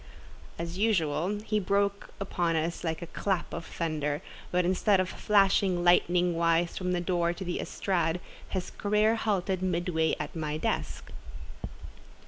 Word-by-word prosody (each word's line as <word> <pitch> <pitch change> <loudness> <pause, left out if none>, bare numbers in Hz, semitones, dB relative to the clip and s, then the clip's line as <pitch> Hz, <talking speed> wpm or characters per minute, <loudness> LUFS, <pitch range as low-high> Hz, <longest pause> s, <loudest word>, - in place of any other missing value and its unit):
As 170 +2 -5
usual 185 -3 +1
he 215 -1 +1
broke 200 +1 0
upon 175 -4 0
us 165 +1 -1
like 160 0 -2
a 170 - -10
clap 190 -3 -1
of 165 - -5
thunder; 155 -1 -2 0.3
but 180 0 +1
instead 190 +2 +3
of 185 - +1
flashing 195 -3 +2
lightning 175 0 +4
wise 165 0 +2
from 180 -1 -2
the 180 - +1
door 175 -1 +1
to 190 +2 -7
the 175 - -2
estrade, 175 -3 -1 0.3
his 185 -2 -3
career 210 +2 +2
halted 195 -4 0
midway 175 -3 +1
at 150 +2 -5
my 155 -2 -2
desk. 155 - -3
180 Hz, 145 wpm, -29 LUFS, 165-195 Hz, 0.3 s, lightning